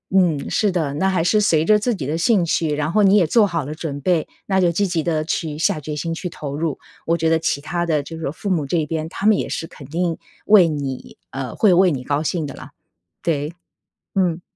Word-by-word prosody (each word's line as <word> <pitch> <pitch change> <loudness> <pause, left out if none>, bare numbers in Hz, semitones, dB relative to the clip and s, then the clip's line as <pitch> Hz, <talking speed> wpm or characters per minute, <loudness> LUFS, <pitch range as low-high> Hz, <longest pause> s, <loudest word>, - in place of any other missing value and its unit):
嗯， 170 -7 +2
是 210 -3 +1
的， 155 -6 -1
那 190 +5 +1
还 180 -4 +1
是 215 +4 +3
随 160 -6 +3
着 215 +3 +5
自 230 +3 0
己 140 -9 -4
的 155 - -1
兴 190 +1 +3
趣， 160 -2 0
然 150 +1 -1
后 210 +3 +3
你 195 0 +5
也 185 -6 +4
做 215 +5 +4
好 165 -6 -2
了 150 +2 -6
准 145 -3 -5
备， 170 +1 +1 0.2
那 190 -1 +2
就 175 -2 +3
积 200 +4 +1
极 170 -3 -1
地 155 -2 0
去 155 -2 -2
下 155 - +1
决 150 +1 -5
心 165 +3 -3
去 170 +2 -4
投 145 -3 -6
入。 160 -1 -2 0.3
我 165 - +2
觉 160 0 +1
得 165 - +4
其 150 -3 -1
他 175 +3 -2
的 155 -3 +1
就 160 +3 -8
是 155 -4 -3
父 200 +5 -5
母 165 -6 +1
这 155 +5 -1
一 155 - +1
边， 160 0 -3
他 200 - -2
们 215 -2 +5
也 - - -2
是 165 - -3
肯 140 - -13
定 165 +2 -1 0.3
为 200 -5 +7
你 140 -4 -5
呃， 130 -2 -5
会 200 -5 +4
为 185 0 +5
你 130 -4 -3
高 145 +4 -1
兴 160 -1 -1
的 - - -8
啦， 135 +3 -11 0.5
对。 150 -1 -1 0.6
嗯。 180 -3 +1
165 Hz, 270 characters per minute, -21 LUFS, 150-180 Hz, 0.6 s, 为